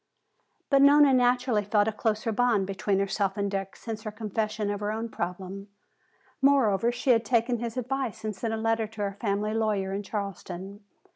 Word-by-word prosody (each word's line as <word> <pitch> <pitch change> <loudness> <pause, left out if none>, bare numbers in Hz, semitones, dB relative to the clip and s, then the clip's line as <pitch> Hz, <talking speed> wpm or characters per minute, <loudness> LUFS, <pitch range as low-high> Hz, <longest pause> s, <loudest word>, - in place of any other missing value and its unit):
But 275 -1 +5
Nona 285 0 +7
naturally 245 -3 +2
felt 205 +1 +2
a - - +2
closer 215 0 -1
bond 225 -3 +2
between 195 +1 -1
herself 195 0 0
and 200 -1 -1
Dick 195 -1 -3
since 225 -2 -6
her 215 - -5
confession 215 0 -2
of 205 - -3
her 205 0 -2
own 225 +2 -3
problem. 190 +2 -5 0.7
Moreover, 240 -6 +3
she 245 +2 +1
had 230 -2 +4
taken 235 +1 +1
his 235 +1 -4
advice 255 -3 -3
and 215 -1 -2
sent 225 +3 -3
a 225 - -1
letter 225 0 0
to 220 0 -9
her 200 -1 -2
family 210 -1 0
lawyer 210 -4 0
in 200 - -2
Charleston. 195 -1 -6
215 Hz, 185 wpm, -27 LUFS, 200-235 Hz, 0.7 s, Nona